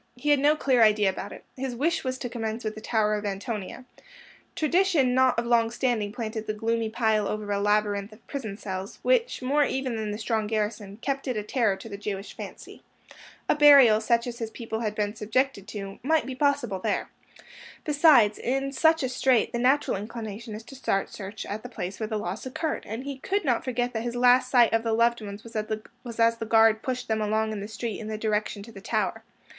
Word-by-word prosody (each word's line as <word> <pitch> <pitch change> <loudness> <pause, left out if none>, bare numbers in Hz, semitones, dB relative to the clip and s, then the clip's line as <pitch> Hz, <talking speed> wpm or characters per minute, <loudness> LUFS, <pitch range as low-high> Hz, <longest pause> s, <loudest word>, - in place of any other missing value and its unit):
He 250 +4 -3
had 290 -1 +5
no 295 +2 +4
clear 260 -5 +2
idea 210 -3 +5
about 195 +2 -7
it. - - -10
His 260 -1 -4
wish 325 +7 0
was 260 -1 -2
to 255 - -4
commence 225 -1 -4
with 215 -1 -2
the 215 - -9
Tower 215 -2 +1
of 210 0 -2
Antonia. 205 +3 -5 0.7
Tradition 320 -5 +2
not 260 -1 +3
of 235 - 0
long 235 -1 +3
standing 235 -4 -1
planted 220 -1 -5
the 215 - -2
gloomy 225 +1 -1
pile 220 -2 +1
over 210 -1 -3
a 200 - +1
labyrinth 205 0 +1
of 215 +2 -17
prison 220 -8 -5
cells, 190 -1 -6
which, - - +1
more 290 +3 +3
even 265 -3 -1
than 215 -1 -3
the 210 - -3
strong 220 -1 -1
garrison, 210 -2 -3
kept 275 0 -2
it 250 -4 -1
a 210 - -2
terror 215 -2 +1
to 210 - -10
the 200 -2 -7
Jewish 200 -1 -5
fancy. - - -10 0.7
A - - +4
burial, 280 -7 +7
such 235 +1 +2
as 240 -1 -6
his 225 -2 -3
people 225 -1 -5
had 215 -2 -2
been 210 -1 -1
subjected 215 0 -1
to, 195 -3 -7
might 315 +4 +2
be 265 - -5
possible 260 -7 0
there. - - -1 0.7
Besides, 290 -8 +5
in 270 +2 -1
such 320 +2 +3
a - - +1
strait, 255 -2 +2
the 240 - -1
natural 265 -1 +2
inclination 220 +1 -6
is 220 - -8
to 270 - -12
start 195 -6 -1
search 200 +1 -7
at 210 +2 -5
the 245 - -9
place 185 -5 -6
where 220 - -2
the 215 - -1
loss 205 +4 -4
occurred, 305 +4 -3
and 225 +4 -5
he 275 -1 -6
could 395 +6 -1
not 245 -4 +1
forget 245 -1 -1
that 225 - -2
his 240 +1 -4
last 250 +1 +4
sight 240 -3 +5
of 225 - +3
the 225 -1 -1
loved 235 +1 +2
ones 205 0 -8
was 230 0 -13 0.6
as 230 0 +4
the 225 - -4
guard 225 -1 +5
pushed 255 -1 -3
them 220 -1 0
along 220 +1 0
the 205 -1 -5
street 220 0 -5
in 215 - -6
the 215 0 -3
direction 210 -1 -1
to 230 - -12
the 195 -3 -11
Tower. - - -1
225 Hz, 220 wpm, -26 LUFS, 210-255 Hz, 0.7 s, burial